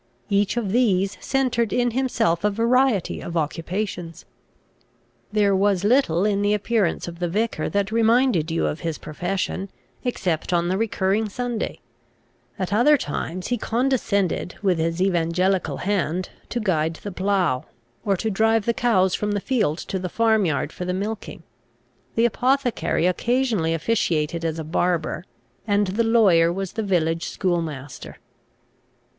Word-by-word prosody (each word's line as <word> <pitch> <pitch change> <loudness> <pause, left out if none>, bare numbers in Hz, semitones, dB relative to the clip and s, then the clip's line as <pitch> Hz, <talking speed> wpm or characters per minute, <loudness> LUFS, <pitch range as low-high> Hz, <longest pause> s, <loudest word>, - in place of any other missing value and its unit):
Each 200 +2 +1
of 210 -5 -1
these 200 -5 +2
centred 250 -5 0
in 245 +2 +1
himself 230 -9 0
a 210 - +4
variety 230 -1 +1
of 170 0 -4
occupations. 165 +2 -3 1.1
There 205 -2 +3
was 195 -1 +2
little 205 -6 +3
in 200 -1 +1
the 205 +1 +2
appearance 210 -4 0
of 170 0 -8
the 175 - 0
vicar 220 +6 -1
that 200 0 -1
reminded 230 - +3
you 165 0 0
of 150 - -2
his 165 -2 -3
profession, 185 +4 -3 0.3
except 185 -9 -1
on 175 0 +1
the 185 - +1
recurring 210 -1 0
Sunday. 240 +1 -3 0.8
At 190 +1 -2
other 290 +8 +5
times 180 - -4
he 245 -2 0
condescended, 225 -8 0
with 185 -4 +2
his 165 +1 -1
evangelical 180 +1 +1
hand 185 -3 -1 0.2
to 240 - -2
guide 165 -6 0
the 205 - -7
plough, 180 -8 0 0.4
or 195 -2 +1
to 220 +4 -2
drive 220 +1 +2
the 235 - +2
cows 190 -7 +2
from 210 0 -1
the 205 - 0
field 210 - 0
to 190 - -4
the 180 0 -4
farm 220 -1 +2
yard 150 -3 -1
for - - -6
the 180 0 -2
milking. 205 -3 -5 0.7
The 230 - +3
apothecary 250 - +1
occasionally 215 -3 +1
officiated 165 -3 0
as 165 -1 -1
a 160 - -4
barber, 170 +1 -1 0.4
and 205 0 +3
the 200 +5 0
lawyer 195 -8 +4
was 195 +1 -4
the 225 - -2
village 165 -5 0
schoolmaster. 160 -8 -3
195 Hz, 150 wpm, -23 LUFS, 170-225 Hz, 1.1 s, other